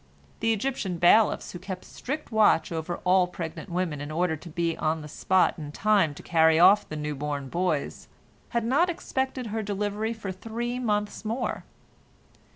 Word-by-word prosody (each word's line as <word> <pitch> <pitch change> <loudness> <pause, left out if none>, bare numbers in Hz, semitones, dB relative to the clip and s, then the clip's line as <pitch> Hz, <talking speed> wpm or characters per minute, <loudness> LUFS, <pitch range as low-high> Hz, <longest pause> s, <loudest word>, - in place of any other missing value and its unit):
The 225 - +2
Egyptian 220 -5 -2
bailiffs, 205 +6 +4
who 175 - -8
kept 185 0 -7
strict 295 +2 -6
watch 215 -7 +4
over 165 +1 -3
all 180 0 +4
pregnant 170 +1 -6
women 170 -4 -2
in 145 - -5
order 160 +1 0
to 160 +3 -11
be 170 0 -1
on 155 0 -1
the - - -8
spot 185 +4 +1
in 145 -2 -6
time 195 -4 +2
to - - -11
carry 160 -1 +4
off 195 +4 +6
their 155 - -5
new 150 0 -3
born 145 -1 -4
boys, 170 -4 -2 0.4
had 235 -2 -1
not 290 +9 +3
expected 265 -6 -2
her 220 - -1
delivery 210 +2 -2
for 210 -4 -6
three 235 +5 -4
months 210 -4 -1
more. 230 +4 -3
185 Hz, 170 wpm, -27 LUFS, 160-220 Hz, 0.4 s, off